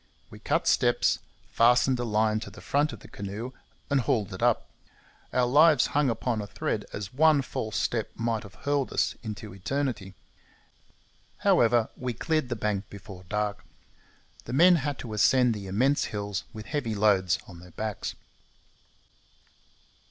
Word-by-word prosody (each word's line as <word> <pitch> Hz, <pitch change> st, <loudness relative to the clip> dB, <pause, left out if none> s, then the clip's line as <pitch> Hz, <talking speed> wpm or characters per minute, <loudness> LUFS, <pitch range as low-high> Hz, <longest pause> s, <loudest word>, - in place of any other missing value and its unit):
We -, -, -11 dB
cut -, -, 0 dB
steps, -, -, +3 dB, 0.3 s
fastened 125 Hz, +2 st, +4 dB
a -, -, -1 dB
line 110 Hz, -1 st, +1 dB
to -, -, -8 dB
the -, -, -13 dB
front 145 Hz, +2 st, +1 dB
of 115 Hz, -3 st, -10 dB
the -, -, -12 dB
canoe, 100 Hz, +5 st, -6 dB, 0.4 s
and 140 Hz, -2 st, +2 dB
hauled 105 Hz, -4 st, 0 dB
it 95 Hz, -, -7 dB
up. 120 Hz, -1 st, +2 dB, 0.6 s
Our 125 Hz, -1 st, +2 dB
lives 150 Hz, +3 st, +5 dB
hung 145 Hz, -2 st, +3 dB
upon 115 Hz, -1 st, -1 dB
a 100 Hz, -, -6 dB
thread, 100 Hz, -, -3 dB
as 100 Hz, +1 st, -6 dB
one 150 Hz, 0 st, +4 dB
false 110 Hz, -4 st, -4 dB
step 115 Hz, -3 st, -1 dB
might 115 Hz, -1 st, -1 dB
have 100 Hz, -2 st, -13 dB
hurled 145 Hz, -2 st, 0 dB
us -, -, +1 dB
into 105 Hz, -2 st, -7 dB
eternity. 105 Hz, -2 st, -3 dB, 1.3 s
However, 115 Hz, -1 st, +4 dB
we 125 Hz, -1 st, -3 dB
cleared 155 Hz, +2 st, -1 dB
the 120 Hz, -, -1 dB
bank 105 Hz, -2 st, -2 dB
before 100 Hz, -2 st, -11 dB
dark. 105 Hz, -1 st, -2 dB, 0.8 s
The 120 Hz, -, -6 dB
men 175 Hz, +5 st, +6 dB
had 145 Hz, -2 st, -2 dB
to 110 Hz, -, -6 dB
ascend 125 Hz, +3 st, +4 dB
the 100 Hz, -2 st, -7 dB
immense 130 Hz, +9 st, +2 dB
hills 100 Hz, -2 st, -4 dB
with 110 Hz, -1 st, -9 dB
heavy 125 Hz, -7 st, -2 dB
loads 100 Hz, -4 st, +3 dB
on 90 Hz, -3 st, -11 dB
their 90 Hz, +1 st, -13 dB
backs. 105 Hz, +4 st, -4 dB
115 Hz, 160 wpm, -27 LUFS, 105-130 Hz, 1.3 s, men